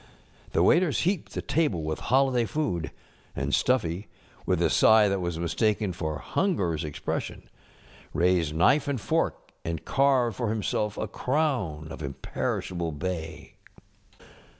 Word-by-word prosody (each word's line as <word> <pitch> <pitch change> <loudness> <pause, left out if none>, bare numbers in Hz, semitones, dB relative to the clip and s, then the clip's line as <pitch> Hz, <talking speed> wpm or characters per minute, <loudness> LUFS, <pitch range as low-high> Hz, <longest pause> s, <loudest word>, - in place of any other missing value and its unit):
The - - +3
waiters 170 -3 +4
heaped 185 -1 -1
the - - -3
table 130 - 0
with 80 0 -3
holiday 130 -2 +2
food 95 - -1
ŌĆö - - -10 0.5
and - - -2
Stuffy, 100 -6 +1 0.4
with - - +2
a - - +2
sigh 110 -1 +6
that 100 -1 0
was 85 -2 -2
mis┬¼ 85 0 -3
taken 105 -3 +1
for 80 -4 -3
hungerŌĆÖs 95 - +1
expression, 75 -1 -4 0.6
raised 85 -3 +2
knife 135 - +4
and 140 -3 -1
fork - - -1
and 80 -2 -4
carved 130 -6 +2
for 120 - -1
himself 105 -1 -1
a - - -2
crown 125 - -1
of 80 - -8
imperishable 80 +4 -3
bay. 80 +1 -5
100 Hz, 140 wpm, -27 LUFS, 80-130 Hz, 0.6 s, sigh